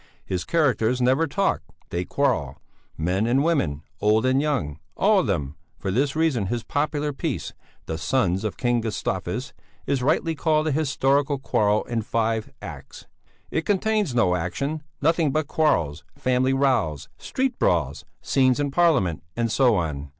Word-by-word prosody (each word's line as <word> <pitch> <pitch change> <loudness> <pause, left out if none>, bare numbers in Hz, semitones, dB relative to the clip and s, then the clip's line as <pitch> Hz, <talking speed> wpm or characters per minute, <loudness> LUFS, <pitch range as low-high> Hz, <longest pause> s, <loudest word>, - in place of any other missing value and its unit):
His 90 -1 -3
characters 130 -7 +2
never 130 +6 +3
talk, 195 +7 0 0.3
they 90 +1 -2
quarrel; 105 - 0 0.4
men 90 +7 0
and 130 +4 +3
women, 110 - 0 0.2
old 110 +3 +3
and 130 +1 +3
young, 85 - -1 0.2
all 205 0 +4
of 160 - 0
them; 75 -7 -2 0.2
for 95 - -3
this 135 +7 +1
reason 155 -11 +1
his 115 +2 -2
popular 145 +2 -1
piece, - - -3 0.3
The 80 0 -4
Sons 95 0 +1
of 110 - -3
King 120 -1 +1
Gustavus, 110 -2 -3 0.3
is 135 -2 0
rightly 165 +5 +1
called 155 0 +1
a - - 0
historical 140 -1 +1
quarrel 105 -5 +1
in 115 -2 -2
five 110 0 -1
acts; - - -9 0.5
it - - 0
contains 205 - +1
no 90 -7 +3
action, 140 - -2 0.2
nothing 165 -1 +3
but 155 +2 0
quarrels: 85 - +1
family 130 +1 +1
rows, 130 - +1
street 260 -2 -2
brawls, - - +1 0.2
scenes 130 -1 +3
in 145 -1 0
Parliament, 135 - +2
and 115 -1 0
so 125 -3 +4
on. 75 -6 -2
130 Hz, 155 wpm, -24 LUFS, 100-150 Hz, 0.5 s, all